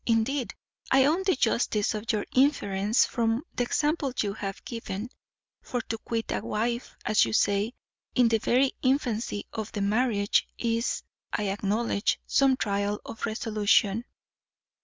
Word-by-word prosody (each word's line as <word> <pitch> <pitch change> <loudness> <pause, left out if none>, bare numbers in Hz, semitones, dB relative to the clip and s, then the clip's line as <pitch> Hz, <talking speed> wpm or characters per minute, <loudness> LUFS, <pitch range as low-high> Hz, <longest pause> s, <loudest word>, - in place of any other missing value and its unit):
Indeed, 235 +3 +1 0.3
I 265 0 +5
own 320 +6 +2
the 375 - +4
justice 225 -4 +1
of 215 +1 -2
your 210 -2 -1
inference 220 -6 +3
from 230 +2 0
the 245 - 0
example 295 +1 0
you 200 -2 0
have 195 -2 -6
given; 230 -1 -5 0.5
for 245 - -3
to 225 0 -5
quit 225 0 -3
a - - 0
wife, 235 +3 -2
as 215 - +4
you 110 - -1
say, 205 - +2 0.4
in 250 -2 +5
the 225 -1 +2
very 255 +4 +3
infancy 245 -6 0
of 220 0 -5
marriage, 205 0 +1
is, 230 0 -1 0.3
I 210 -1 -1
acknowledge, 205 +2 0
some 270 -1 +3
trial 205 -1 -1
of 225 - -4
resolution." 215 0 +1
225 Hz, 140 wpm, -27 LUFS, 205-250 Hz, 0.5 s, I